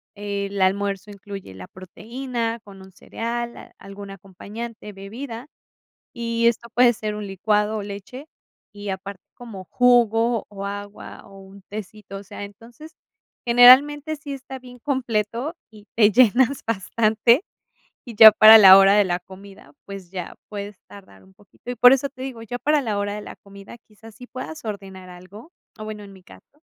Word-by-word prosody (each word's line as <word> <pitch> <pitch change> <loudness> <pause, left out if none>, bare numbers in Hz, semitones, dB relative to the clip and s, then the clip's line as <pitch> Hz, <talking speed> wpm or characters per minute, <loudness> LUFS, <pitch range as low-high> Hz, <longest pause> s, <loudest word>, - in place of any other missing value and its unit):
El 200 -1 -5
almuerzo 195 +1 -1
incluye 200 - -10
la 90 -1 -11
proteína 230 +5 -6
con 195 -2 -15
un 190 0 -15
cereal, 235 +5 -6
algún 200 0 -11
acompañante, 210 +4 -10
bebida, 225 +6 -9 0.7
y 235 0 -1
esto 235 0 -1
puede 245 0 +5
ser 215 -1 -5
un 210 0 -6
licuado, 210 +2 -1
o 210 - -5
leche. 205 +8 -10 0.5
Y 205 0 -8
aparte 190 0 -7
como 225 -6 -11
jugo, 235 +1 +2
o 200 -1 -8
agua, 205 0 -9
o 195 0 -15
un 195 +1 -15
tecito. 210 -1 -9
O 195 - -10
sea, 200 - -10
entonces, 230 +9 -13 0.5
generalmente 275 +6 +5
sí 285 -1 -8
está 265 -1 -9
bien 250 -1 -15
completo 245 +1 -3 0.2
y 210 -1 -17
te 215 -2 +4
llenas 255 +4 +3
bastante, 230 - +1 0.6
y 235 -3 -11
ya 220 +1 +10
para 215 +1 +9
la 190 -3 +9
hora 195 +1 +5
de 205 -1 +4
la 175 -1 -2
comida, 190 -3 -15
pues, 195 -3 -10
ya 180 -3 -7
puedes 205 0 -7
tardar 190 - -16
un 190 - -22
poquito. 205 +5 -12
Y - - -6
por 245 +2 +7
eso 270 +1 -1
te 260 -2 -14
digo, 255 -4 -7
ya 245 +2 -7
para 300 +2 +1
la 220 -5 -3
hora 205 0 -3
de 210 - -7
la - - -11
comida, 200 +3 -14
quizás 220 0 -17
sí 250 +2 -13
puedas 260 +3 -9
ordenar 195 -3 -8
algo, 190 - -14 0.3
o 215 - -7
bueno 215 -1 -8
en 200 - -13
mi 190 -1 -16
caso 290 +10 -20
210 Hz, 170 wpm, -22 LUFS, 195-240 Hz, 0.7 s, ya